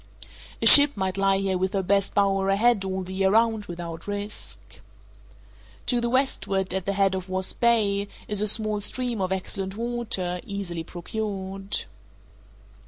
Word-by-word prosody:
A - - +2
ship 285 -4 +9
might 190 -1 -1
lie 195 0 +2
here 190 -1 -1
with 190 0 -1
her 195 -1 0
best 200 +1 +1
bower 195 -1 +2
ahead 210 +1 +3
all 190 0 -3
the 185 +1 -8
year 190 0 +2
round 220 0 +2
without 170 -2 -7
risk. 205 +1 -6 1.0
To 245 -2 +2
the 235 - -1
westward, 200 -8 0
at 190 -1 -3
the 200 - +1
head 195 -1 +2
of 190 0 -5
Wasp 185 0 -1
Bay, 205 -4 +2 0.2
is 210 -1 -2
a 210 - +1
small 215 0 +2
stream 240 0 -2
of 185 0 -1
excellent 190 +1 -3
water, 225 -7 -2
easily 190 -5 -5
procured. 195 +2 -4
195 Hz, 160 wpm, -25 LUFS, 190-215 Hz, 1.0 s, ship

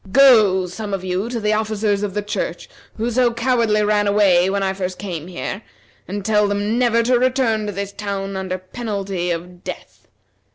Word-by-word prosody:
Go, 215 -8 +6
some 200 +3 -4
of 190 - -7
you, 185 +4 -2
to 240 -1 -3
the 210 0 +1
officers 215 -1 0
of 205 -2 -3
the 210 - -1
church, 205 - -4 0.3
who 230 +2 -1
so 245 0 +3
cowardly 235 -3 +1
ran 210 0 +2
away 195 -3 +4
when 200 0 0
I 190 0 0
first 185 -1 -4
came 175 -5 -5
here, 185 +3 -5 0.5
and 200 +1 -5
tell 210 -1 +3
them 205 +3 0
never 235 -2 +3
to 245 +1 +3
return 245 -4 +1
to - - -2
this 200 0 -4
town 200 -1 -4
under 190 -1 -3
penalty 195 -2 -4
of 175 +1 -5
death. - - -9
205 Hz, 190 wpm, -20 LUFS, 190-220 Hz, 0.5 s, Go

